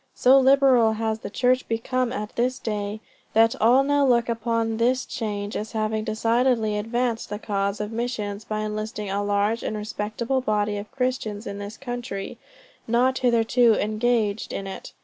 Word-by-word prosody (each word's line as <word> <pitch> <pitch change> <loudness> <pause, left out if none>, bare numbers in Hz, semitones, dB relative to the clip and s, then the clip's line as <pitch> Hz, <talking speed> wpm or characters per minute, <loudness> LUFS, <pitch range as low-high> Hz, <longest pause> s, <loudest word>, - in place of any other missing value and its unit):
So 265 +2 +6
liberal 265 -4 +5
has 220 0 -2
the - - -6
church 250 +4 +1
become 240 +2 -1
at 210 -4 -5
this 250 +2 0
day, 210 -2 -4 0.3
that 225 +1 +4
all 245 +4 +5
now 285 0 +2
look 240 -3 +3
upon 230 -1 -1
this 250 +2 +1
change 205 -2 -4
as 215 +1 -4
having 215 0 -1
decidedly 225 0 +1
advanced 230 +2 -1
the 205 - -3
cause 200 -1 -2
of 210 +1 -4
missions 220 -3 -3
by 215 +1 -3
enlisting 215 -1 -4
a 200 +1 -1
large 205 +3 +1
and 215 - -3
respectable 215 +4 -2
body 210 -3 0
of 205 +1 -7
Christians 250 -5 -2
in 200 0 -5
this 205 +2 -7
country, 245 -6 -6 0.5
not 250 +3 +2
hitherto 235 -1 +3
engaged 215 0 0
in 195 - -4
it. 195 - -7
225 Hz, 165 wpm, -24 LUFS, 210-245 Hz, 0.5 s, So